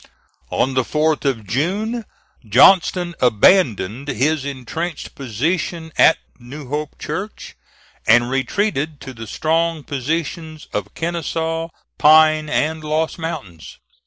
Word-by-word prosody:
On 130 Hz, -, 0 dB
the 130 Hz, -, +2 dB
4th 150 Hz, +4 st, 0 dB
of 120 Hz, -6 st, -1 dB
June, 205 Hz, -, -1 dB, 0.4 s
Johnston 175 Hz, -, +4 dB
abandoned 120 Hz, -, +3 dB
his 140 Hz, +3 st, 0 dB
intrenched 140 Hz, +5 st, -5 dB
position 160 Hz, -, -2 dB
at -, -, +6 dB, 0.2 s
New 130 Hz, +3 st, -10 dB
Hope 150 Hz, +1 st, -4 dB
Church, 205 Hz, +3 st, -6 dB, 0.5 s
and 120 Hz, +2 st, +5 dB
retreated 145 Hz, -, -1 dB
to 130 Hz, -, -8 dB
the 115 Hz, -2 st, -9 dB
strong 165 Hz, +4 st, 0 dB
positions 155 Hz, +3 st, -4 dB
of 105 Hz, 0 st, -4 dB
Kenesaw, 165 Hz, 0 st, -2 dB, 0.3 s
Pine, 155 Hz, 0 st, +5 dB
and 155 Hz, +1 st, 0 dB
Lost 155 Hz, +2 st, -1 dB
mountains. 100 Hz, -, -7 dB
155 Hz, 110 wpm, -20 LUFS, 130-165 Hz, 0.5 s, at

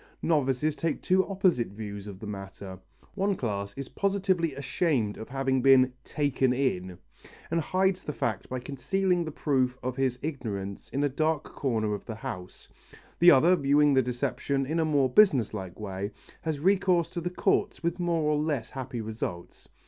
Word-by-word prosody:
Novices 145 Hz, -1 st, +1 dB
take 165 Hz, -1 st, -1 dB
two 190 Hz, +1 st, +3 dB
opposite 185 Hz, -, +2 dB
views 100 Hz, 0 st, -7 dB
of 100 Hz, -2 st, -8 dB
the 110 Hz, -, -8 dB
matter. 95 Hz, -2 st, -7 dB, 0.3 s
One 195 Hz, 0 st, 0 dB
class 100 Hz, -, -3 dB
is 140 Hz, -1 st, -5 dB
positively 190 Hz, -6 st, 0 dB
ashamed 135 Hz, -, 0 dB
of 110 Hz, -, -9 dB
having 135 Hz, -1 st, 0 dB
been 130 Hz, -1 st, +6 dB
"taken 135 Hz, -3 st, +1 dB
in," 95 Hz, -9 st, -1 dB, 0.5 s
and 165 Hz, 0 st, +2 dB
hides 185 Hz, +3 st, +1 dB
the -, -, -3 dB
fact 110 Hz, -7 st, -3 dB
by 130 Hz, -1 st, -3 dB
concealing 175 Hz, +8 st, 0 dB
the 155 Hz, -, -5 dB
proof 130 Hz, -4 st, 0 dB
of 125 Hz, 0 st, -3 dB
his 130 Hz, -2 st, +1 dB
ignorance 105 Hz, -10 st, -4 dB
in 140 Hz, -, -1 dB
a -, -, +4 dB
dark 155 Hz, +2 st, 0 dB
corner 110 Hz, -6 st, -1 dB
of 105 Hz, -, -5 dB
the 110 Hz, -, -4 dB
house; 90 Hz, -4 st, -7 dB, 0.5 s
the 175 Hz, -, +8 dB
other, 170 Hz, +4 st, +6 dB
viewing 145 Hz, -1 st, +4 dB
the 130 Hz, -, +5 dB
deception 130 Hz, +2 st, -1 dB
in 160 Hz, +5 st, -1 dB
a 160 Hz, -, +2 dB
more 145 Hz, -4 st, +3 dB
business 130 Hz, -, +4 dB
like 95 Hz, -3 st, -6 dB
way, 100 Hz, -1 st, -4 dB, 0.3 s
has 160 Hz, -3 st, -2 dB
recourse 180 Hz, -1 st, +3 dB
to 170 Hz, -, -5 dB
the 175 Hz, -, -2 dB
courts 180 Hz, -, 0 dB
with 170 Hz, +2 st, -1 dB
more 170 Hz, -2 st, +1 dB
or 150 Hz, 0 st, +2 dB
less 150 Hz, -7 st, -2 dB
happy 130 Hz, -3 st, -5 dB
results. 105 Hz, -5 st, -6 dB
135 Hz, 175 wpm, -28 LUFS, 110-165 Hz, 0.5 s, the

